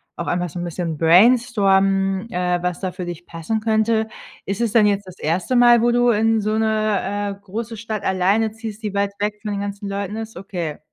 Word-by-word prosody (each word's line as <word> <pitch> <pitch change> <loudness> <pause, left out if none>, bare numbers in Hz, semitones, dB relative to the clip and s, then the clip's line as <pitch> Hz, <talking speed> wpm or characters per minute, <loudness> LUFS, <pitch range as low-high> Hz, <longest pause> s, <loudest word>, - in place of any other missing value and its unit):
auch 170 - -5
einfach 175 0 -1
so 175 - -7
'n - - -3
bisschen 170 -2 -4
brainstormen, 195 - +3
äh, 180 0 0
was 180 -1 -2
da 185 -2 -3
für 180 0 -6
dich 175 0 -7
passen 165 +7 -3
könnte. 220 0 +1 0.4
Ist 195 +3 -3
es 230 -3 +1
dann 220 -1 +5
jetzt 200 -1 0
das 185 - -12
1. 175 +10 0
Mal, 240 -1 +6
wo 240 - +3
du 245 0 +3
in 225 0 +2
so 215 +1 -1
'ne, 210 -2 0
äh, - - -28
große 225 +4 -5
Stadt 215 -1 -5
alleine 195 +4 +1
ziehst, 225 -1 -8
die 210 -2 -4
weit 200 0 0
weg 210 0 -2
von 210 -1 -4
den 200 - -2
ganzen 200 0 -5
Leuten 200 +1 -4
ist? 225 -4 -7
Okay. 180 -6 -5
205 Hz, 215 wpm, -21 LUFS, 185-220 Hz, 0.4 s, Mal